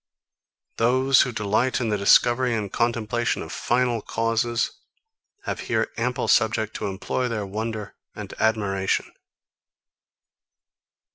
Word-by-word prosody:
Those, 130 Hz, +3 st, +4 dB
who 125 Hz, -, 0 dB
delight 110 Hz, +3 st, 0 dB
in 120 Hz, -3 st, -1 dB
the 105 Hz, -, +1 dB
discovery 120 Hz, +4 st, +4 dB
and 105 Hz, -3 st, -4 dB
contemplation 115 Hz, 0 st, 0 dB
of -, -, -9 dB
final 120 Hz, -2 st, 0 dB
causes, 115 Hz, +1 st, 0 dB, 0.7 s
have -, -, -4 dB
here 115 Hz, -1 st, 0 dB
ample 125 Hz, +2 st, -1 dB
subject 110 Hz, -1 st, +2 dB
to -, -, -3 dB
employ 100 Hz, +6 st, -2 dB
their 110 Hz, -4 st, -3 dB
wonder 110 Hz, +1 st, -4 dB, 0.2 s
and -, -, -7 dB
admiration. 100 Hz, -3 st, 0 dB
115 Hz, 115 wpm, -24 LUFS, 105-120 Hz, 0.7 s, Those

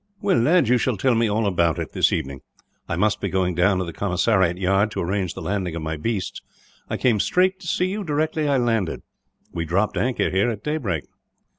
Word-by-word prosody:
"Well, 200 Hz, -3 st, +2 dB
lad, 155 Hz, +3 st, +3 dB
you 125 Hz, +1 st, +3 dB
shall 125 Hz, -4 st, 0 dB
tell 130 Hz, +6 st, +2 dB
me 115 Hz, -1 st, +2 dB
all 110 Hz, +2 st, 0 dB
about 85 Hz, -5 st, +1 dB
it, -, -, -4 dB
this -, -, +2 dB
evening. 70 Hz, -5 st, -3 dB, 0.5 s
I -, -, -1 dB
must 105 Hz, +4 st, +1 dB
be -, -, -1 dB
going 95 Hz, -1 st, 0 dB
down 90 Hz, +3 st, +2 dB
to 95 Hz, -, -1 dB
the 85 Hz, -, -7 dB
commissariat 95 Hz, -2 st, +1 dB
yard, 95 Hz, +3 st, +2 dB
to -, -, -5 dB
arrange 95 Hz, 0 st, -2 dB
the -, -, -7 dB
landing 95 Hz, -4 st, -2 dB
of 85 Hz, -, -4 dB
my 80 Hz, +1 st, -2 dB
beasts. 95 Hz, +2 st, -3 dB, 0.5 s
I -, -, -2 dB
came 120 Hz, -5 st, +2 dB
straight 185 Hz, -, +2 dB
to 180 Hz, -, -10 dB
see 180 Hz, -, +1 dB
you, 200 Hz, +3 st, -3 dB
directly 155 Hz, -1 st, -1 dB
I 140 Hz, -1 st, +2 dB
landed. 115 Hz, -7 st, 0 dB, 0.5 s
We 85 Hz, -, -2 dB
dropped 95 Hz, +6 st, 0 dB
anchor 125 Hz, 0 st, 0 dB
here 95 Hz, +5 st, +2 dB
at 110 Hz, -3 st, -5 dB
daybreak." 120 Hz, -, -2 dB
105 Hz, 220 wpm, -23 LUFS, 90-130 Hz, 0.5 s, lad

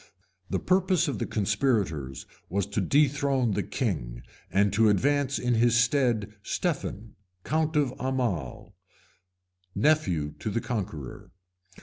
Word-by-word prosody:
The -, -, 0 dB
purpose 185 Hz, -2 st, +2 dB
of 140 Hz, -, -2 dB
the -, -, -2 dB
conspirators 100 Hz, -, -1 dB, 0.2 s
was 100 Hz, +1 st, 0 dB
to 100 Hz, +1 st, -2 dB
dethrone 140 Hz, 0 st, +2 dB
the -, -, 0 dB
king, -, -, -3 dB, 0.3 s
and 100 Hz, 0 st, +2 dB
to 110 Hz, +1 st, +4 dB
advance 140 Hz, +6 st, +2 dB
in 125 Hz, 0 st, 0 dB
his 115 Hz, 0 st, +3 dB
stead 115 Hz, -4 st, +2 dB
Stephen, 115 Hz, -, -3 dB, 0.3 s
count 155 Hz, +1 st, 0 dB
of 140 Hz, -4 st, +2 dB
Aumale, 120 Hz, -, -2 dB, 1.0 s
nephew 90 Hz, -, +1 dB
to 90 Hz, -, -3 dB
the 105 Hz, -, -1 dB
Conqueror. 95 Hz, -, -5 dB
115 Hz, 120 wpm, -27 LUFS, 100-140 Hz, 1.0 s, to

